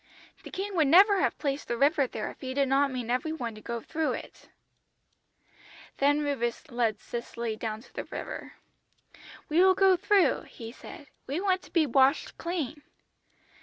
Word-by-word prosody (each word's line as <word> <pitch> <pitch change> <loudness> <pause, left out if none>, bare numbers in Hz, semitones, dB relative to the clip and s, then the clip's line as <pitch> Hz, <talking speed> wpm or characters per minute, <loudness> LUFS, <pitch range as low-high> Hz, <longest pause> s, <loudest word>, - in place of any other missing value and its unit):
The - - -10
King 390 +1 -4
would 315 -4 +3
never 390 +6 +6
have - - +1
placed 280 -1 -3
the 235 - -2
river 280 +1 +3
there 215 - -5
if - - -18
He 260 -1 -5
did 280 -1 +2
not 275 +1 +3
mean 250 -3 -4
every 255 +6 0
one 240 -8 -4
to 215 - -12
go 235 +2 -4
through 315 +5 -1
it.' - - -9 1.5
"Then 290 +2 +3
Rufus 275 +1 -2
led 235 -3 0
Cicely 235 -1 -5
down 220 0 -4
to - - -20
the - - -5
river. - - -7 0.9
"'We 310 +3 +2
will 375 0 +6
go 385 0 +5
through,' 390 -4 +2
he 225 -1 -9
said. 285 - -11 0.2
'We 290 +7 -2
want 380 -2 +1
to - - -17
be 330 -3 +3
washed 270 +2 +2
clean.' 315 -5 -3
280 Hz, 175 wpm, -28 LUFS, 240-335 Hz, 1.5 s, never